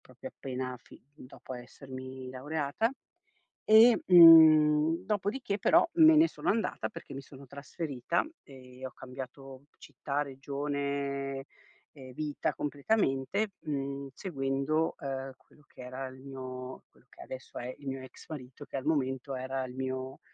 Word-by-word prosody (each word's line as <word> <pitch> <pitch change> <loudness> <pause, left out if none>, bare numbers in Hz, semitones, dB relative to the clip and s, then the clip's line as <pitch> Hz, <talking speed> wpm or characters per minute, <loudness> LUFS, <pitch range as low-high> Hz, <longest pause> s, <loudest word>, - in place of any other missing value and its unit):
proprio - - -11
appena 130 -1 -5
fi - - -16
dopo 130 -2 -10
essermi 130 +1 -9
laureata. 145 - -1 0.8
E, 225 +2 +7
mhmm, 160 -1 +8
dopodiché, 205 +2 -1
però, - - +5
me 320 -1 +8
ne 315 +2 +6
sono - - -4
andata, 225 +2 0
perché 175 - -10
mi 135 - -6
sono 135 0 -14
trasferita, 140 +3 -3 0.2
ehm, 130 -1 -12
ho 130 - -6
cambiato 130 +1 -10
città, 145 +1 -3
regione, 140 0 -3 0.5
ehm, 130 -3 -12
vita 150 +1 -2
completamente, 150 +4 0
mhmm, 140 -2 -4
seguendo, 140 -1 -1
uhm, 135 -1 -5
quello 150 - -25
che - - -14
era 130 +1 -6
il 130 0 -12
mio 130 -1 -7
quello - - -27
che - - -16
adesso 130 0 -8
è 125 +1 -6
il 140 - -11
mio 135 0 -3
ex 130 - -13
marito 140 -2 -8
che - - -6
al 130 - -5
momento 135 -3 -1
era 130 +1 -3
il 125 - -9
mio 130 0 -4
140 Hz, 140 wpm, -30 LUFS, 130-155 Hz, 0.8 s, mhmm